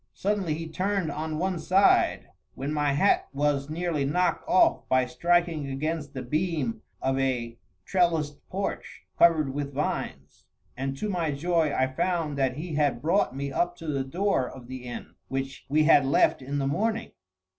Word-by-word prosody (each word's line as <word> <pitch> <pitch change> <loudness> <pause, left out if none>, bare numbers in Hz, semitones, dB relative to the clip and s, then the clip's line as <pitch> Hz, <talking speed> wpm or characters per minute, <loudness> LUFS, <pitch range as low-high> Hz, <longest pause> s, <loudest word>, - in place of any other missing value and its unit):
Suddenly 195 -6 0
he 165 +1 -5
turned 185 0 -1
on 155 +1 -3
one 185 +1 -1
side, 190 +5 +3 0.2
when 140 +3 -3
my 145 -2 +1
hat 175 +9 +3
was 140 0 0
nearly 165 -2 -1
knocked 180 +6 +1
off 185 - +3
by 130 0 +3
striking 170 +1 +1
against 150 +2 -3
the 130 - -4
beam 150 -4 -1 0.2
of 135 0 +1
a 120 -3 -1 0.3
trellised 165 -5 +1
porch, 195 +1 -4 0.2
covered 155 -5 +4
with 140 -1 -4
vines; 70 - -4 0.3
and 135 +1 -3
to 215 - -2
my 175 -5 -1
joy 160 +1 +1
I 130 - +2
found 155 +3 -1
that 130 -1 +1
he 165 +1 -5
had 145 -5 +1
brought 160 -3 +1
me 140 0 -3
up 175 +5 0
to 165 - -11
the 140 -3 0
door 150 -1 0
of 130 -2 -11
the 130 0 -8
inn 120 - -7
which 135 0 -4
we 155 +2 +3
had 150 -2 +6
left 135 0 +3
in 140 +2 -3
the 140 - 0
morning. 220 +11 -1
150 Hz, 170 wpm, -27 LUFS, 135-175 Hz, 0.3 s, had